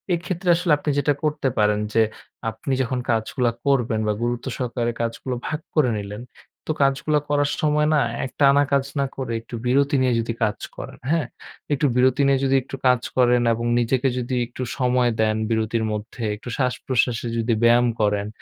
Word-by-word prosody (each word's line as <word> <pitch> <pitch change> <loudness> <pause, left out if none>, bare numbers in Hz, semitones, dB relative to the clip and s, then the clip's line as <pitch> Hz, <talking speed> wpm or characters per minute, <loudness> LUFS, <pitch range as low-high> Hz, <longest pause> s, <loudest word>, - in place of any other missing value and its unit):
এক্ষেত্রে 175 +1 -3
আসলে 175 -1 0
আপনি 150 - -4
যেটা 145 - +2
করতে 150 -2 0
পারেন। 105 0 +3 0.2
যে 115 - +5 0.5
আপনি 130 +5 -4
যখন 125 0 -2
কাজগুলো 120 +3 0 0.2
করবেন 120 -5 +2
বা 105 - +2
গুরুত্ব 120 0 -2
সহকারে 120 -1 -2
কাজগুলো 115 +2 -3
ভাগ 155 - -2 0.2
করে 150 -6 +4
নিলেন 105 +2 -7 0.5
তো - - +1
কাজগুলো 140 +2 +2
করার 145 0 +2
সময় 150 0 +2
না 150 - +4 0.3
এক 130 - -7
টানা 140 0 +6
কাজ 140 -1 +2
না 140 - +2
করে 130 -3 -4
একটু 115 +1 -9
বিরতি 140 +3 +3
নিয়ে 130 -1 +2 0.3
কাজ 105 - 0 0.2
করেন, - - -8
হ্যাঁ? 165 -6 +1 0.5
একটু 145 +1 +1
বিরতি 130 +2 +3
নিয়ে 135 -1 +3
যদি 135 0 +2
একটু 135 - -7
কাজ 125 -2 +4 0.2
করেন 125 -1 +4
এবং 115 +1 -3
নিজেকে 125 +3 +1
যদি 125 +1 -2
একটু 120 - -9 0.2
সময় 125 -1 +2
দেন। 110 0 +2 0.2
বিরতির 110 0 0
মধ্যে 110 +3 -6
একটু 110 +4 -9
শ্বাস-প্রশ্বাসে 125 -2 0
যদি 115 +1 +1
ব্যায়াম 120 +1 +5
করেন 105 -1 +1
125 Hz, 175 wpm, -23 LUFS, 115-140 Hz, 0.5 s, টানা